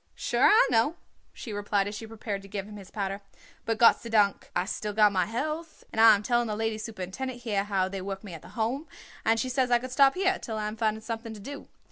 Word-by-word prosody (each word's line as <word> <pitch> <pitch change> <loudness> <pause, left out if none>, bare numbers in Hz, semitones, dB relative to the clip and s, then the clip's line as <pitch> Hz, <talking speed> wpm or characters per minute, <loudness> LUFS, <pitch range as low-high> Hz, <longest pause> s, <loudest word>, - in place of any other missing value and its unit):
"Sure, - - +2
I 445 +4 +6
know," 240 +8 +3 0.4
she 225 - -8
replied 205 -1 0
as 205 - -5
she 220 +2 -7
prepared 215 -2 -5
to 195 - -13
give 200 0 -5
him 210 - -10
his 195 -2 -11
powder; 195 -1 -3 0.4
"but 225 0 0
Gott 230 0 +6
sei 235 - -7
dank 205 -3 +2
I 175 - +1
still 210 +1 -4
got 210 0 +5
my 185 -3 +1
health, 305 +8 -4
and 220 - +1
I 225 -1 +9
am 205 - -4
telling 240 +1 +1
the 210 - -2
lady 225 0 -2
superintendent 225 +4 -5
here 205 -4 0
how 195 -2 +1
they 195 0 -5
work 195 +1 -5
me 195 -4 -8
at 160 - -8
the - - -13
Home, 250 +8 -1 0.4
and 225 +1 +3
she 255 - -1
says 255 0 +1
I 240 - +5
could 255 +2 -7
stop 270 +1 +5
here 380 +1 +1
till 220 -2 -5
I 210 0 -2
am 215 - -5
finding 220 -1 0
something 225 0 -5
to - - -10
do. 280 +7 -8
220 Hz, 255 wpm, -28 LUFS, 205-240 Hz, 0.4 s, I